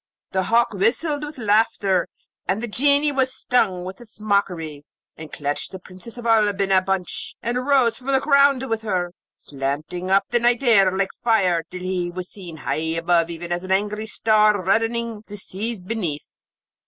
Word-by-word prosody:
The 190 - +1
hawk 235 +1 +2
whistled 285 - 0
with 295 0 -7
laughter, 205 -4 +2 0.4
and 190 +4 0
the - - -2
Genie 285 +6 +3
was 265 -2 +1
stung 195 -8 0
with 190 +4 -8
its 220 -3 -11
mockeries, 175 -8 -2
and 155 -1 -10
clutched 145 0 -3
the 190 - -6
Princess 185 +6 -12
of 240 - -8
Oolb 210 -3 +3
in 195 -1 0
a 190 -1 +5
bunch, 190 -1 -3
and 235 +1 -1
arose 255 -2 +2
from 255 - -14
the 270 -1 +3
ground 280 -2 +3
with 225 -2 -2
her, 180 -5 -2 0.2
slanting 145 +6 -4
up 195 +1 +4
the 240 - +3
night 240 +2 +2
air 200 -7 +5
like 190 +1 -1
fire, 190 -8 +3
till 180 0 -8
he 185 -1 -2
was 180 +1 -6
seen 175 -5 -10
high 160 +1 -2
up 170 0 +2
even 170 +1 -7
as 175 +1 -1
an 185 - -6
angry 210 +3 0
star 215 -1 +3
reddening 225 +1 0
the 205 - -8
seas 205 +1 -4
beneath. 180 -8 -4
200 Hz, 180 wpm, -22 LUFS, 180-235 Hz, 0.4 s, a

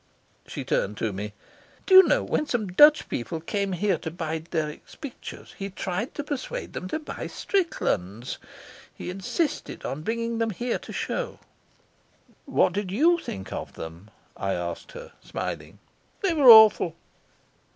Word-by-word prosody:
She - - -5
turned 105 +1 -1
to 110 -3 -1
me. 105 +2 -5 0.5
"Do 380 - +1
you 375 - +13
know, - - +2
when 300 - -1
some 235 -6 0
Dutch 295 +10 +7
people 160 +7 -3
came 200 +3 -2
here 180 -1 +1
to - - -4
buy 160 -1 -3
Dirk's 155 -2 -5
pictures 280 -4 -9
he 195 0 -3
tried 190 +4 -4
to 290 - -3
persuade 295 - -5
them 185 - -5
to 195 - -2
buy 310 - -6
Strickland's? 120 - -1 0.6
He - - -5
insisted 230 - -3
on 140 - -4
bringing 230 +4 -2
them 225 0 +1
here 240 +4 -2
to - - -10
show." - - -3 1.1
"What - - +2
did 200 -2 -2 0.3
think 95 - -6
of - - -5
them?" 85 +6 -9 0.3
I 95 0 -2
asked 85 - -5
her, - - -9
smiling. - - -5 0.5
"They 380 -3 +2
were 285 -6 +6
awful." 220 -7 +9
195 Hz, 150 wpm, -26 LUFS, -, 1.1 s, you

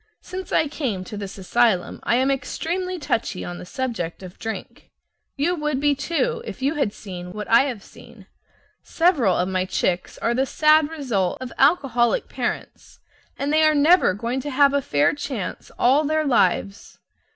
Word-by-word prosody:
Since 370 0 -7
I 310 - +2
came 255 -11 -3
to 200 - -8
this 200 -1 -7
asylum 195 -1 +1
I - - +1
am 260 +2 +2
extremely 365 +7 -3
touchy 225 - -2
on 175 0 -6
the - - -10
subject 200 -9 -4
of 180 -1 -11
drink. 225 0 -7 0.5
You 310 +6 +1
would 300 -4 -1
be, 290 0 +3
too, 340 - -1
if - - -8
you 275 +3 0
had 280 -9 0
seen 180 -3 -9
what 210 0 -6
I 235 +4 +5
have 240 -7 -5
seen. - - -15 0.6
Several 300 - +2
of 180 - 0
my 185 -1 -1
chicks 180 -1 -1
are 235 - 0
the 265 +2 0
sad 305 +1 +4
result 245 - -1
of 255 -1 -7
alcoholic 270 - +2
parents, - - -5 0.4
and 285 +2 -1
they 310 - +4
are 310 -1 +4
never 295 - +4
going 235 +5 -2
to 290 - -5
have 280 +1 +4
a 280 - +2
fair 145 - +2
chance 270 -8 -5
all 270 +5 +4
their 310 +1 0
lives. 200 -6 0
260 Hz, 175 wpm, -23 LUFS, 200-300 Hz, 0.6 s, I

